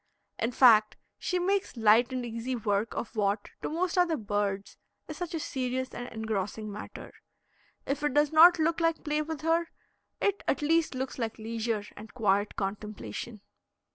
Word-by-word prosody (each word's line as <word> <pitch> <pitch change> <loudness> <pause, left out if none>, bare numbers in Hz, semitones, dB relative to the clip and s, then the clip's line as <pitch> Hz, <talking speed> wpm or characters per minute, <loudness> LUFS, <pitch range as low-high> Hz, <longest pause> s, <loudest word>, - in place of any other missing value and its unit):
In 230 - 0
fact, 225 -4 +6 0.2
she 365 - -1
makes 380 -4 0
light 225 +3 +5
and 255 -1 -3
easy 235 +2 -3
work 210 -1 -1
of 230 - -5
what, 205 -1 0
to - - -3
most 360 +3 0
other 340 -3 +3
birds, 205 -2 -2 0.3
is 310 - -7
such 350 -1 -4
a - - -1
serious 260 -2 -2
and 245 - -6
engrossing 215 -1 -3
matter. 210 - -9 0.7
If 275 +1 -2
it 295 -2 -1
does 295 0 +4
not 335 +3 +8
look 330 +1 +1
like 330 -1 +1
play 300 0 0
with 310 0 -5
her, 330 +1 +1 0.5
it 405 0 0
at 275 - 0
least 325 -1 +2
looks 260 0 -4
like 225 -2 -3
leisure 225 -1 -2
and 215 +2 -12
quiet 205 -3 +1
contemplation. 205 - -5
245 Hz, 170 wpm, -29 LUFS, 215-315 Hz, 0.7 s, not